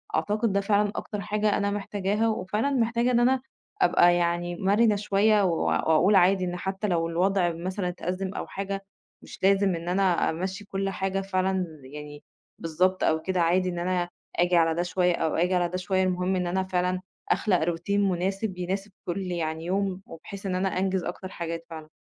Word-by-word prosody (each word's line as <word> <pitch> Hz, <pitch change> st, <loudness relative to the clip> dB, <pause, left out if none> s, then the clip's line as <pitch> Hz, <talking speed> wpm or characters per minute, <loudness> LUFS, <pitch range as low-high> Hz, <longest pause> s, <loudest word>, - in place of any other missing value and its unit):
أعتقد 215 Hz, +2 st, 0 dB
ده 200 Hz, -, +2 dB
فعلًا 205 Hz, 0 st, +2 dB
أكتر 210 Hz, -1 st, -4 dB
حاجة 210 Hz, 0 st, 0 dB
أنا 200 Hz, 0 st, 0 dB
محتاجاها 205 Hz, +1 st, -1 dB
وفعلًا 220 Hz, +4 st, -1 dB
محتاجة 235 Hz, -1 st, +1 dB
إن 240 Hz, -, +3 dB
أنا 255 Hz, +2 st, +3 dB, 0.4 s
أبقى 175 Hz, -, +5 dB
يعني 175 Hz, 0 st, 0 dB
مَرِنة 205 Hz, +4 st, +3 dB
شوية 205 Hz, +1 st, +3 dB
و 170 Hz, -3 st, +1 dB
وأقول 165 Hz, +6 st, +3 dB
عادي 185 Hz, 0 st, +4 dB
إن 175 Hz, 0 st, -3 dB
حتّى 190 Hz, +3 st, -3 dB
لو 165 Hz, -3 st, +1 dB
الوضع 180 Hz, +1 st, +2 dB
مثلًا 180 Hz, +3 st, -3 dB
اتأزِّم 185 Hz, +2 st, -3 dB
أو -, -, -5 dB
حاجة 195 Hz, 0 st, -4 dB, 0.4 s
مش -, -, -11 dB
لازم 195 Hz, -1 st, +4 dB
إن 170 Hz, +1 st, -5 dB
أنا 185 Hz, -1 st, +2 dB
أمَشِّي 190 Hz, +5 st, -4 dB
كل 195 Hz, 0 st, -2 dB
حاجة 195 Hz, 0 st, -2 dB
فعلًا 190 Hz, -1 st, 0 dB, 0.2 s
يعني 145 Hz, +2 st, -10 dB, 0.4 s
بالضبط 185 Hz, +3 st, +1 dB
أو 160 Hz, 0 st, +2 dB
كده 185 Hz, 0 st, 0 dB
عادي 180 Hz, +2 st, +2 dB
إن 175 Hz, -, -4 dB
أنا 175 Hz, 0 st, -1 dB, 0.3 s
آجي 175 Hz, 0 st, +3 dB
على 165 Hz, -1 st, +4 dB
ده 175 Hz, -, 0 dB
شوية 180 Hz, 0 st, +1 dB
أو 160 Hz, -2 st, -1 dB
آجي 180 Hz, +2 st, +2 dB
على 175 Hz, -1 st, +1 dB
ده 180 Hz, -, -3 dB
شوية 190 Hz, +1 st, 0 dB
المهم 185 Hz, 0 st, 0 dB
إن 180 Hz, -1 st, -1 dB
أنا 190 Hz, +2 st, 0 dB
فعلًا 180 Hz, 0 st, -1 dB, 0.3 s
أخلَق 185 Hz, -6 st, +2 dB
روتين 175 Hz, +5 st, 0 dB
مناسب 190 Hz, +2 st, -2 dB
يناسب 195 Hz, +3 st, -3 dB
كل 180 Hz, +3 st, -2 dB
يعني 160 Hz, -1 st, -3 dB
يوم 190 Hz, +1 st, -1 dB
وبحيث 195 Hz, +4 st, -10 dB
إن 185 Hz, -1 st, -1 dB
أنا 190 Hz, +1 st, +1 dB
أنجِز 190 Hz, -1 st, 0 dB
أكتر 180 Hz, +2 st, -5 dB
حاجات 165 Hz, -1 st, -5 dB
فعلًا. 160 Hz, -1 st, -8 dB
185 Hz, 185 wpm, -26 LUFS, 175-200 Hz, 0.4 s, أبقى